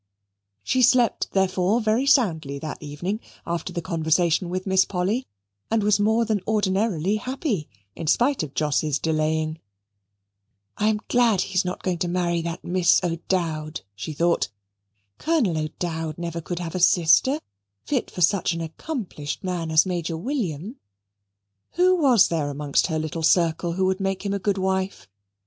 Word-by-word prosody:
She 255 - +1
slept, 245 -2 +3
therefore, 190 +2 +2
very 225 +4 +1
soundly 165 - +2
that 155 +2 -6
evening, 155 +8 -4 0.3
after 170 +1 -3
the 170 -2 -4
conversation 170 0 +1
with 185 +1 -3
Miss 190 -1 +4
Polly, 200 +8 -1 0.4
and 225 -1 +1
was 205 -1 +3
more 220 +3 +2
than 215 -3 0
ordinarily 205 -2 +1
happy, 250 - -3 0.3
in 165 - -6
spite 250 - +2
of 150 -3 -6
Jos's 150 -1 +1
delaying. 155 0 -1 1.2
"I 210 - 0
am 215 -1 +1
glad 235 -6 +3
he 195 - -4
is 185 - +3
not 180 0 -5
going 180 -2 -1
to 175 - -1
marry 175 -1 0
that 170 0 -5
Miss 180 0 +3
O'Dowd," 165 -2 -2
she 105 +10 -6
thought. 170 - +1 0.7
"Colonel 295 - +1
O'Dowd 160 0 -4
never 170 -1 -4
could 175 +2 -5
have 170 -2 -5
a 185 - -2
sister 180 - +4 0.5
fit 270 -5 -1
for 180 - -7
such 180 +1 +3
an 165 - -4
accomplished 165 - -5
man 175 -3 -2
as 160 +2 +5
Major 175 -3 -2
William." 210 - -3 1.0
Who 365 +1 +4
was 265 - +5
there 155 -4 -1
amongst 145 0 0
her 160 -3 -1
little 155 +1 -3
circle 170 0 +2
who 190 +2 0
would 190 +1 0
make 195 0 -2
him 200 - -1
a 200 - -1
good 200 +1 0
wife? 190 - -2
180 Hz, 160 wpm, -24 LUFS, 160-210 Hz, 1.2 s, as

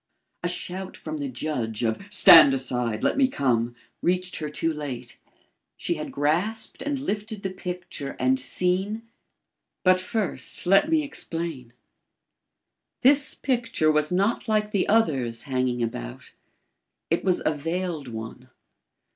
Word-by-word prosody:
A 175 - -1
shout 185 +1 -4
from 155 -1 -6
the 145 -1 -3
judge 120 -4 -3
of 110 -1 0
"Stand 165 -8 +8
aside, 125 -4 -2
let - - +1
me 265 - +5
come!" 120 - 0 0.3
reached 180 +1 0
her 155 -1 -4
too 165 +2 -1
late. 130 -5 -6 0.6
She 175 - -1
had 155 -2 -6
grasped 175 +10 0
and 290 -1 -1
lifted 215 -5 -4
the 190 - -2
picture 180 -6 -6
and 130 +1 +2
seen 185 - 0 0.8
But 185 0 +5
first, 200 0 -3
let 195 - +5
me 320 -1 +3
explain. 165 - -4 1.3
This 285 +3 +4
picture 235 - +1
was 150 +1 +1
not 200 +7 +1
like 210 -1 +1
the 200 -3 0
others 135 - +1
hanging 125 -3 -1
about. - - -6 0.8
It 165 - +1
was 185 -2 +1
a 155 - +3
veiled 165 0 -3
one. 115 +2 -8
165 Hz, 135 wpm, -25 LUFS, 130-195 Hz, 1.3 s, Stand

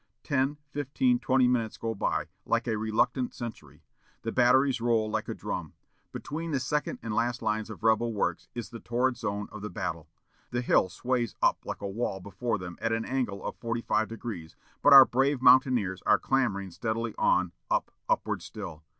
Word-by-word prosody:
Ten, 140 0 0
fifteen, 195 - +1
twenty 130 - +3
minutes 115 -3 0
go 115 0 -2
by, 100 - -1 0.2
like - - 0
a 110 - +1
reluctant 110 +4 0
century. 75 - -8 0.4
The 115 - -2
batteries 125 +1 +4
roll 115 -2 +2
like 110 0 -2
a - - -3
drum. - - -5 0.4
Between 165 +3 -5
the 140 -4 0
second 150 +3 -1
and 115 - -3
last 120 +2 0
lines 110 0 -1
of 110 - -9
rebel 115 +1 +3
works 95 -5 -2
is 120 -1 -5
the 115 - -7
torrid 125 +2 0
zone 105 -3 -3
of 105 - -8
the 105 - -4
battle. 85 -3 -4 0.4
The 120 - -1
hill 105 -6 +3
sways 120 +3 -1
up - - +3
like - - -5
a - - -1
wall 100 -1 -2
before 100 +5 -3
them 90 -2 -8
at 115 - 0
an 115 0 0
angle 125 -7 -2
of - - -4
forty 115 0 -3
five 110 - +1
degrees, 105 -8 -7 0.3
but 145 - +5
our 135 -1 +12
brave 135 +3 +1
mountaineers 125 -7 +4
are - - +5
clambering 100 -8 0
steadily 110 +5 -2
on 90 -1 +3 0.2
up - - 0 0.2
upward - - 0
still!... 80 -1 -8
115 Hz, 185 wpm, -28 LUFS, 105-130 Hz, 0.4 s, our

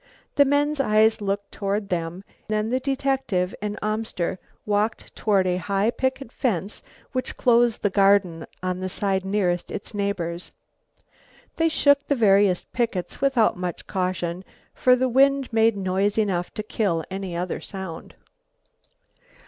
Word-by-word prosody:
The 285 - +5
men's 290 +1 +1
eyes 220 -3 +3
looked 200 0 -2
toward 200 0 -2
them, 175 +1 -3 0.2
then 215 +1 -1
the 255 - +1
detective 265 -9 -1
and 210 0 -3
Amster 215 -4 -2 0.3
walked 210 +2 -1
toward 200 -3 +2
a 180 -1 +1
high 200 +4 0
picket 260 -1 -2
fence 205 -6 -2 0.3
which 255 0 -3
closed 240 -2 +3
the 205 - +2
garden 195 -4 +3 0.2
on 185 0 -2
the 185 0 -3
side 190 0 0
nearest 190 -3 0
its 205 - -6
neighbours. 185 -4 -3 1.1
They 330 0 +3
shook 285 -2 +3
the 285 - +2
various 200 -5 +4
pickets 215 -7 -2
without 270 -8 +3
much 180 -2 -4
caution, 180 -1 -2 0.3
for 250 0 +4
the 255 +1 +1
wind 270 0 +3
made 225 -1 +3
noise 195 +2 0
enough 190 -5 0
to 215 - -3
kill 195 -7 -1
any 190 -2 -4
other 180 +1 -3
sound. 190 -4 -8
205 Hz, 140 wpm, -24 LUFS, 185-235 Hz, 1.1 s, The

